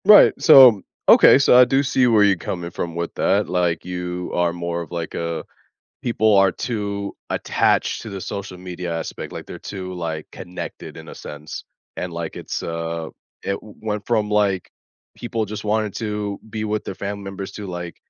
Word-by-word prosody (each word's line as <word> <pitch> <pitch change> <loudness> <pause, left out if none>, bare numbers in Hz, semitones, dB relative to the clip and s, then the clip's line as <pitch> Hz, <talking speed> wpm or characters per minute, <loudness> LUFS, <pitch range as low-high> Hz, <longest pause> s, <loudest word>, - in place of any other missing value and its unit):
Right, 210 +1 +9
so 130 - +9 0.3
Okay, - - +8
so 130 -2 +6
I 125 - +9
do 135 +2 +2
see 130 -2 +2
where 110 -3 +5
you're 100 -2 +4
coming 85 0 -4
from 85 -1 -4
with 85 0 -3
that, 100 +1 +1
like, 90 -2 0
you 90 0 -4
are 85 -1 +1
more 85 0 -3
of 85 - -9
like 85 -2 -4
a 85 -1 -3 0.6
"people 110 -3 +3
are 95 -1 +5
too 100 -2 -4
attached - - +1
to 110 - -7
the 100 -1 -6
social 95 -1 -6
media" 90 -2 -5
aspect, 80 - -6
like, - - -7
they're - - -8
too, 95 -2 -6
like, 80 -3 -4
connected 90 +1 -8
in - - -11
a - - -9
sense, 75 +1 -8 0.3
and, 90 -1 -4
like, 85 -1 -5
it's, - - -4
uh 85 -1 -4 0.3
it 100 0 -2
went 105 -1 -5
from, 110 -3 +1
like, 100 -3 +1 0.5
people 115 -2 -3
just 105 +1 -6
wanted 105 -1 0
to 105 -2 -3
be 110 0 -4
with 105 0 -2
their - - -5
family 100 +1 -5
members 95 0 -6
to, 105 0 -7
like 90 -2 -6
95 Hz, 185 wpm, -22 LUFS, 85-105 Hz, 0.6 s, Right